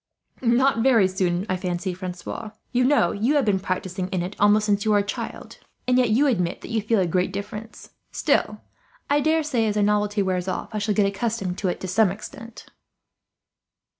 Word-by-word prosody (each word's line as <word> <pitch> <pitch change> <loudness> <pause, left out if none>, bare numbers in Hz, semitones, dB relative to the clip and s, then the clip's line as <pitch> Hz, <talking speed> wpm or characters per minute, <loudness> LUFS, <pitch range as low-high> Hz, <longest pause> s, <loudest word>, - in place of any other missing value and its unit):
"Not 245 +1 +3
very 230 -6 +5
soon, 185 -1 -1
I 185 - -1
fancy, 180 0 -3
Francois. 185 +4 -6 0.2
You 250 0 +2
know, 255 -10 +3
you 235 +9 +1
have 285 -4 +3
been 200 -3 +2
practising 185 0 -3
in 185 -2 -2
it 185 +3 -6
almost 210 +1 +4
since 200 -1 +1
you 220 - 0
were 210 - +4
a 200 - +2
child; 200 - -6 0.3
and 250 - +3
yet 245 -2 +3
you 245 +7 +3
admit 180 -10 0
that - - -9
you 225 -1 0
feel 220 +1 +1
a 185 - +2
great 180 +2 0
difference. 210 +3 -7 0.2
Still, - - 0 0.5
I 290 - +4
daresay 300 -6 +1
as 210 - -1
the 210 - +2
novelty 205 0 +1
wears 185 -1 -1
off 185 +4 -4
I 215 - -1
shall 205 0 0
get 210 - +3
accustomed 195 -2 -2
to 195 - -1
it, 180 - -2
to 190 - -4
some 200 +3 +3
extent." 220 +3 -9
205 Hz, 200 wpm, -24 LUFS, 185-230 Hz, 0.5 s, very